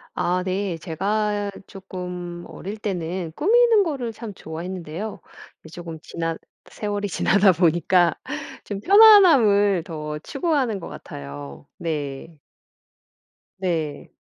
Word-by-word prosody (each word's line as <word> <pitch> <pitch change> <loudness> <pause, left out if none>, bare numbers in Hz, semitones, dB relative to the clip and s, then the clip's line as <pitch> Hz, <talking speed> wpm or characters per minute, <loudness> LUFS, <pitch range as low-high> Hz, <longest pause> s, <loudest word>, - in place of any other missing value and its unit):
아 180 +1 0
네. 185 -2 -2
제가 205 +5 -1 0.2
쪼끔 180 -2 -7
어릴 205 +3 -7
때는 180 -4 -3
꾸미는 455 +4 +5
거를 265 - -3
참 220 -2 -8
좋아했는데요. 175 +3 -6 0.4
이제 160 - -14
쪼금 170 -2 -7
지나 165 0 -4 0.3
세월이 205 -1 -3
지나다 200 +1 +4
보니까 175 +1 +3 0.5
좀 200 -2 -5
편안함을 275 - +7
더 150 -2 -5
추구하는 270 - -1
것 - - -8
같아요. 70 0 -9
네. 150 -1 -5 1.2
네. 160 -6 -3
185 Hz, 225 characters per minute, -23 LUFS, 165-210 Hz, 1.2 s, 편안함을